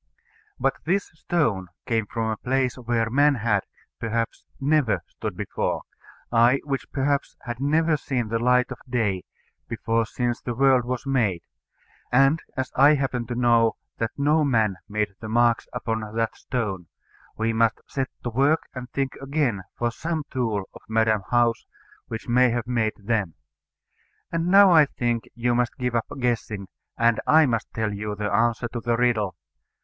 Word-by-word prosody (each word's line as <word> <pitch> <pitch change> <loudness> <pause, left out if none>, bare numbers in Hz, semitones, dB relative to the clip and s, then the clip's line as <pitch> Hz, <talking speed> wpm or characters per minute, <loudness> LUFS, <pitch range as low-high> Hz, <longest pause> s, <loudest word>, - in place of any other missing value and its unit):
But - - +1
this 190 +4 0
stone 150 - 0 0.2
came 115 -4 0
from 110 0 -2
a 110 - -3
place 130 +1 0
where 115 -2 -1
man 145 +2 +4
had, 110 -4 +1 0.4
perhaps, 115 0 -2 0.2
never 145 -4 +2
stood - - -6
before, - - -2 0.5
ay, 120 +3 +5
which, 140 -2 -4
perhaps, 140 +1 -1
had 120 0 -5
never 155 +3 +2
seen 130 -4 -2
the 115 +1 0
light 125 +2 +3
of 125 - -6
day 105 -7 0 0.4
before 115 -1 0
since 120 0 -2
the 120 - -4
world 130 -1 +4
was 125 +2 -3
made; 110 -11 +1 0.7
and 135 +5 +4 0.2
as 130 0 -2
I 145 +3 +6
happen 130 -4 -2
to 120 - -3
know 120 -2 +4 0.3
that 115 - 0
no 150 +2 +3
man 110 -8 +2
made 105 -1 -1
the 110 - -7
marks 120 +1 +2
upon 110 -1 -2 0.2
that 115 -1 0
stone, 100 -9 -3 0.5
we 115 +1 0
must 115 0 +2
set 135 -2 -3
to 120 - -3
work 140 +7 +2
and 125 -1 -7
think 135 +1 -2
again 135 -7 0 0.2
for 120 0 0
some 160 +4 -3
tool 115 -6 -1
of - - -12
Madam 110 -1 +2
How's 120 -1 +2 0.4
which 110 - -6
may 125 +1 +4
have 120 0 -1
made 115 -3 0
them. 100 -5 -1 1.0
And 165 0 -1
now 195 +1 +7
I 155 -4 +7
think 120 -3 -1
you 120 0 +1
must 120 -1 0
give 125 -2 -2
up 115 -1 0
guessing, 115 -5 -1 0.3
and 115 -1 +3
I 155 0 +6
must 115 -4 -1
tell 110 -2 -1
you 105 +1 -4
the 105 0 -3
answer 115 +3 +2
to 120 - -4
the 115 0 0
riddle. 110 -6 +1
120 Hz, 165 wpm, -24 LUFS, 115-135 Hz, 1.0 s, now